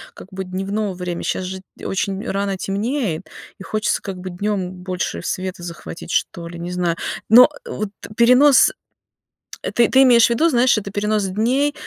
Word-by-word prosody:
как - - -12
бы, 190 0 -5
дневного 195 +2 -3
время. 180 -1 -4
Щас - - -2
же, 190 +1 -6 0.2
т - - -11
очень 195 +1 -2
рано 195 0 -1
темнеет, 200 - -2 0.4
и - - -8
хочется, 215 +2 -1
как 195 -2 -6
бы, 185 +1 -7
днём 190 0 -2
больше 185 0 -4
света 185 -1 -4
захватить, 170 -1 -8
что 170 -1 -1
ли, 170 0 -9
не 175 +1 -5
знаю. 175 -2 0 0.3
Но 245 +4 +9 0.2
вот 215 - -4 0.3
перенос, 250 +8 +6 0.9
э, - - -3
ты 235 -1 +3
ты 265 +1 +6
имеешь 240 -3 +6
в - - -4
виду, 275 +8 +3
знаешь, 245 -4 +3
это 200 -2 -4
перенос 210 +1 0
дней, 245 +9 +1
195 Hz, 175 wpm, -20 LUFS, 185-235 Hz, 0.9 s, Но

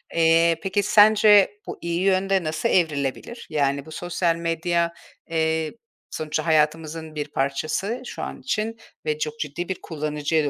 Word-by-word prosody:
Eee, 165 0 +4
peki, 195 +1 0
sence 210 -1 +6
bu - - -5
iyi 170 +1 -2
yönde 195 0 +2
nasıl 155 0 -1
evrilebilir? 155 - -1
Yani, 140 -1 0
bu 160 - -12
sosyal 175 0 -1
medya, 170 0 0 0.4
eee, 160 -1 0 0.4
sonuçta 155 0 -3
hayatımızın 160 0 0
bir 150 -1 -3
parçası 155 - -2
şu - - -7
an - - -6
için 225 -2 -2 0.3
ve 150 -1 0
çok 155 0 -3
ciddi 155 +5 -4
bir 190 - -4
kullanıcıya 150 0 -1
da 145 - +1
165 Hz, 150 wpm, -24 LUFS, 155-185 Hz, 0.4 s, sence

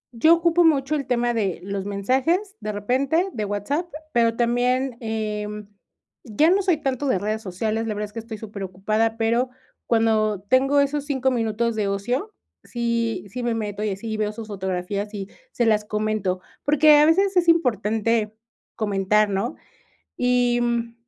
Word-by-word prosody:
Yo 315 +8 +6
ocupo 340 +1 +3
mucho 300 -3 +3
el 280 -4 -2
tema 240 -1 +1
de 200 -6 -1
los 195 0 -4
mensajes, 265 - 0
de 215 - -4
repente, 265 - 0
de 215 -2 -3
WhatsApp, 205 - -2 0.2
pero 230 -2 +2
también, 245 +2 +1
eh, 215 -2 -3 0.8
ya 280 +8 +2
no 390 +2 +3
soy 365 -4 +2
tanto 275 -1 -2
de 255 - +2
redes 215 +3 -2
sociales. 220 +3 -2
La 215 - -2
verdad 210 +1 -2
es 210 - -14
que 230 - -5
estoy 225 -1 -7
superocupada, 210 +2 -2
pero 230 +3 +1 0.4
cuando 220 -3 +2
tengo 260 +7 +3
esos 280 0 -1
5 265 -3 0
minutos 230 -1 0
de 210 -2 0
ocio, 245 - -2 0.3
sí 235 -4 -2
sí 250 +6 -5
me 240 -1 -1
meto 210 -2 -3
y 215 - 0
así 215 +3 -4
veo 215 -1 -1
sus 220 0 -8
fotografías 195 +1 -3
y 195 -1 -6 0.2
se 240 - 0
las 215 -2 +3
comento. 210 -3 -1 0.2
Porque 300 +1 +6
a 300 - +6
veces 385 +4 +3
es 350 -1 +3
importante 225 - +1 0.4
comentar, 210 0 +1
¿no? 200 +8 -2 0.6
Y 245 -1 +2
mm, 235 -1 -1
230 Hz, 165 wpm, -23 LUFS, 210-260 Hz, 0.8 s, Yo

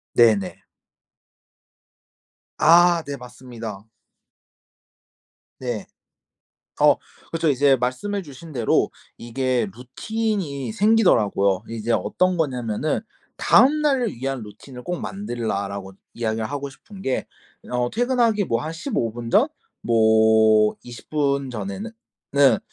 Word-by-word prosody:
네네. 100 -5 +3 1.9
아. 170 +1 +5
네. 140 -1 -5
맞습니다. 120 -5 -9 1.8
네. 120 -5 -4 1.0
어. - - +6 0.4
그쵸. 165 -1 +1
이제 140 0 +4
말씀해 130 +12 -2
주신 155 +1 -12
대로 120 -6 +1 0.3
이게 125 -1 -1
루틴이 170 - -3
생기더라고요. 115 - +3
이제 115 0 -3
어떤 185 +8 +1
거냐면은 125 -2 -1 0.4
"다음 300 +4 +5
날을 265 -7 +1
위한 135 +1 -4
루틴을 125 +5 -12
꼭 175 -1 -3
만들라."라고 100 - -4 0.2
이야기를 110 -1 -2
하고 140 +1 -4
싶은 195 +8 -14
게 135 -8 -1 0.5
어 125 0 0
퇴근하기 235 - +1
뭐 115 0 0
한 160 +1 -5
15 165 - -2
분 115 0 -6
전? 235 - +4 0.4
뭐 110 -1 +4
20 120 -1 -11
분 140 -3 0
전에는 115 - -5 0.4
는 135 -5 +5
130 Hz, 210 characters per minute, -23 LUFS, 115-170 Hz, 1.9 s, 어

